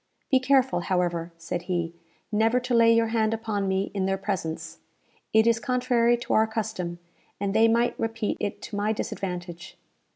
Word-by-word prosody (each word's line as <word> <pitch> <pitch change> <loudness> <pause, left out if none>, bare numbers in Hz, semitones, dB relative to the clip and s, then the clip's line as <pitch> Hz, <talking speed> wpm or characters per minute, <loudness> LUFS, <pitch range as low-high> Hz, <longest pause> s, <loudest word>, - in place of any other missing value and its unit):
"Be 260 - +6
careful, 265 -4 +3
however," 175 -2 -1
said 170 +1 -4
he, 170 -2 -1 0.4
"never 225 +3 +3
to 250 0 -3
lay 230 -1 +6
your 230 0 +3
hand 225 -1 +1
upon 215 -3 -2
me 190 +1 0
in 190 -2 -1
their 195 0 0
presence. 170 -5 -4 0.5
It 220 0 +5
is 230 -1 +3
contrary 245 -1 +2
to 240 - -3
our 220 0 +4
custom, 215 -6 -3 0.4
and 200 0 -1
they 220 +1 +5
might 235 +1 +1
repeat 225 -1 -2
it 205 - -4
to 210 - -6
my 210 +2 +1
disadvantage." 175 -4 -5
215 Hz, 170 wpm, -26 LUFS, 185-230 Hz, 0.5 s, Be